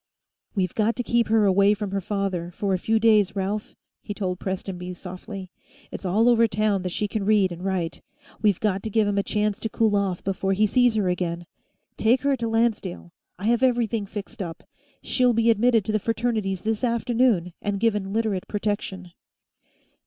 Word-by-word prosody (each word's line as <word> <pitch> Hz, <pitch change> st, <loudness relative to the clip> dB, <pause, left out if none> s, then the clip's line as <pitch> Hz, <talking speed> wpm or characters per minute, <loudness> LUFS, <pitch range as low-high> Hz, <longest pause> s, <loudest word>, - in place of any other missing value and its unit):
"We've 185 Hz, -3 st, 0 dB
got 225 Hz, +1 st, +1 dB
to 245 Hz, -, -2 dB
keep 235 Hz, -1 st, +1 dB
her 220 Hz, -1 st, +3 dB
away 200 Hz, +2 st, +4 dB
from 205 Hz, -1 st, -4 dB
her 195 Hz, 0 st, -1 dB
father, 190 Hz, -3 st, -2 dB
for 195 Hz, +2 st, -2 dB
a 185 Hz, -, 0 dB
few 225 Hz, +4 st, +1 dB
days, 215 Hz, -3 st, +4 dB
Ralph," 200 Hz, +2 st, -3 dB, 0.3 s
he 205 Hz, -, -6 dB
told 185 Hz, -3 st, -3 dB
Prestonby 180 Hz, -1 st, -4 dB
softly. 185 Hz, +1 st, -8 dB, 0.4 s
"It's -, -, -7 dB
all 210 Hz, +6 st, +3 dB
over 230 Hz, -1 st, +5 dB
town 210 Hz, -2 st, 0 dB
that 180 Hz, -, -3 dB
she 210 Hz, -, -1 dB
can 210 Hz, 0 st, -3 dB
read 200 Hz, -2 st, +3 dB
and 175 Hz, +1 st, -7 dB
write. 185 Hz, -4 st, -2 dB, 0.4 s
We've 205 Hz, -4 st, +3 dB
got 200 Hz, -3 st, 0 dB
to 220 Hz, -, -4 dB
give 215 Hz, 0 st, +2 dB
him 200 Hz, 0 st, +1 dB
a -, -, +3 dB
chance 210 Hz, 0 st, -1 dB
to 225 Hz, -, -3 dB
cool 220 Hz, -1 st, +2 dB
off 195 Hz, -3 st, -1 dB
before 195 Hz, 0 st, -1 dB
he 210 Hz, +3 st, +3 dB
sees 245 Hz, +1 st, +3 dB
her 205 Hz, -3 st, +1 dB
again. 175 Hz, -1 st, -2 dB, 0.5 s
Take 240 Hz, +4 st, +3 dB
her 280 Hz, -1 st, +3 dB
to 230 Hz, -1 st, -2 dB
Lancedale. 225 Hz, -6 st, -1 dB, 0.3 s
I 190 Hz, -, -6 dB
have 235 Hz, +2 st, +2 dB
everything 235 Hz, -5 st, +1 dB
fixed 205 Hz, 0 st, -7 dB
up; 165 Hz, -3 st, -6 dB, 0.4 s
she'll 250 Hz, -1 st, +2 dB
be 230 Hz, 0 st, +4 dB
admitted 225 Hz, -1 st, +3 dB
to -, -, -1 dB
the 215 Hz, -, +1 dB
Fraternities 220 Hz, -4 st, -1 dB
this 220 Hz, +2 st, -1 dB
afternoon, 235 Hz, -6 st, +1 dB
and 205 Hz, -1 st, -2 dB
given 210 Hz, -3 st, 0 dB
Literate 215 Hz, -4 st, -1 dB
protection." 205 Hz, -3 st, -3 dB
205 Hz, 190 wpm, -24 LUFS, 190-225 Hz, 0.5 s, over